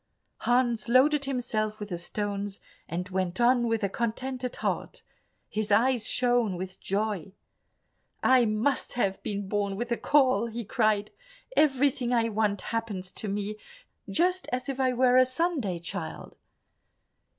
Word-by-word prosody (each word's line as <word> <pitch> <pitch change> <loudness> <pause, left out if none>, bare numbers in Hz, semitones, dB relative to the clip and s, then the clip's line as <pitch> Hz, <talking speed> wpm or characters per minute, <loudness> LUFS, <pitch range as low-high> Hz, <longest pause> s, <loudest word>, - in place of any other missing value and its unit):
Hans 240 -2 +1
loaded 280 +4 +4
himself 220 -5 -2
with 210 -1 -6
the 175 - -3
stones, 200 +2 -3 0.3
and 180 +2 -3
went 185 +1 -2
on 240 0 +4
with 225 -1 0
a - - +3
contented 250 +4 -3
heart; - - -3 0.4
his 215 -1 -3
eyes 240 +1 +3
shone 240 -6 +2
with 185 +1 -6
joy. 200 -2 -2 0.9
"I 255 -2 +5
must 220 +6 0
have 195 -6 0
been 200 -1 -4
born 200 -1 -1
with 240 +4 -4
a 235 - +1
caul," 255 -6 +3
he 230 0 -5
cried; 215 -2 +1 0.4
"everything 270 -4 +2
I 230 -2 +2
want 210 -2 0
happens 210 -5 -3
to 215 - -4
me 205 +1 -3 0.5
just 365 +2 +1
as 250 0 -2
if 270 -1 -4
I 260 -1 +3
were 250 0 +4
a 255 - +7
Sunday 260 - 0
child." 170 -1 -6
230 Hz, 145 wpm, -28 LUFS, 205-255 Hz, 0.9 s, a